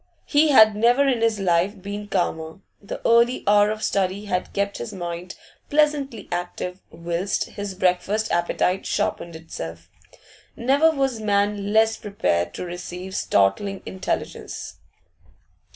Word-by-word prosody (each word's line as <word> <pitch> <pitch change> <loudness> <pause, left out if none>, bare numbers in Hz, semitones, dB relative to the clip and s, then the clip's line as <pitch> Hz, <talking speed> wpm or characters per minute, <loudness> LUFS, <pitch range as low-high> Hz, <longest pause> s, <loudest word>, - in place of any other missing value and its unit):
He 300 +1 +3
had 220 -6 +7
never 240 +6 +4
in 250 -4 +1
his 225 -2 +2
life 190 +2 +1
been 205 +2 -6
calmer; 160 -2 -2 0.2
the 200 - -6
early 235 +2 +4
hour 205 0 +5
of 215 0 -4
study 195 +1 0
had 185 -2 -2
kept 200 0 -2
his 120 - -5
mind 175 0 -6 0.3
pleasantly 290 -7 +1
active 180 +1 -4
whilst 170 +4 -2
his 200 -2 -5
breakfast 190 +4 0
appetite 180 +2 0
sharpened 170 -1 -2
itself. 85 - -8 0.6
Never 275 +7 +3
was 270 -6 0
man 205 -1 0
less 220 +1 +3
prepared 85 - -1
to - - -5
receive 180 +2 -7
startling 145 - +1
intelligence. 190 0 -5
200 Hz, 130 wpm, -23 LUFS, 175-220 Hz, 0.6 s, had